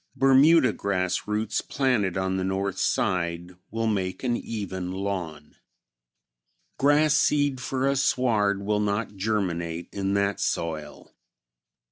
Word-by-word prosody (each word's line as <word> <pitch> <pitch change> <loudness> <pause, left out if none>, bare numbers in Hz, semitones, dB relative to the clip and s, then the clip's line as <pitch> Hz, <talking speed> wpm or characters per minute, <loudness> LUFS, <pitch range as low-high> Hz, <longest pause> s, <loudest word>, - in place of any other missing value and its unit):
Bermuda 135 0 +5
grass 95 -2 -1
roots 105 0 -1
planted 120 -10 0
on 95 0 -1
the 95 - -1
north 95 +1 -2
side 85 -1 -1 0.2
will 115 +1 -2
make 95 -3 -2
an 120 -2 +1
even 95 -6 -5
lawn. 90 -6 -5 1.2
Grass 145 +2 +4
seed 145 -3 +2
for 130 +1 -1
a 140 - +2
sward 110 -7 +1
will 105 +1 0
not 105 0 -1
germinate 85 -5 -2
in 100 0 -1
that 100 0 0
soil. 80 -3 -4
100 Hz, 120 wpm, -26 LUFS, 95-125 Hz, 1.2 s, Bermuda